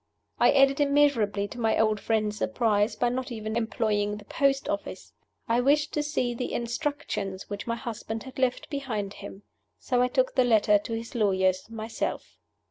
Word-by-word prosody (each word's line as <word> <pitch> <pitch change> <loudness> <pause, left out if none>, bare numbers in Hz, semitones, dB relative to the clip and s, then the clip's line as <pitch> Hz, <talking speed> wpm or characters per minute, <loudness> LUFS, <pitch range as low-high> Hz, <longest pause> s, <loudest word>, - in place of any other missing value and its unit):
I - - +6
added 275 0 +4
immeasurably 280 -9 +2
to 245 - -9
my 225 -1 +2
old 215 -1 +2
friend's 215 -1 0
surprise 215 -2 +1
by 245 - +1
not 255 +1 -3
even 220 -1 -4
employing 210 -2 0
the 210 - -12
post 275 +2 +1
office. 200 - -5 0.3
I 235 +1 +2
wished 295 +3 +2
to 300 - +1
see 295 -5 -1
the 245 +1 -4
"instructions" 235 -7 -3
which 205 +2 -5
my 230 - 0
husband 225 -2 -5
had 265 0 -10
left 255 -1 0
behind 225 -8 -3
him. 200 0 -10 0.3
So 250 -2 0
I 250 - +4
took 255 0 +1
the 255 - +4
letter 215 -3 +4
to 225 - -6
his 230 0 -5
lawyers 190 -3 +1
myself. 225 0 -5
230 Hz, 175 wpm, -27 LUFS, 210-260 Hz, 0.3 s, I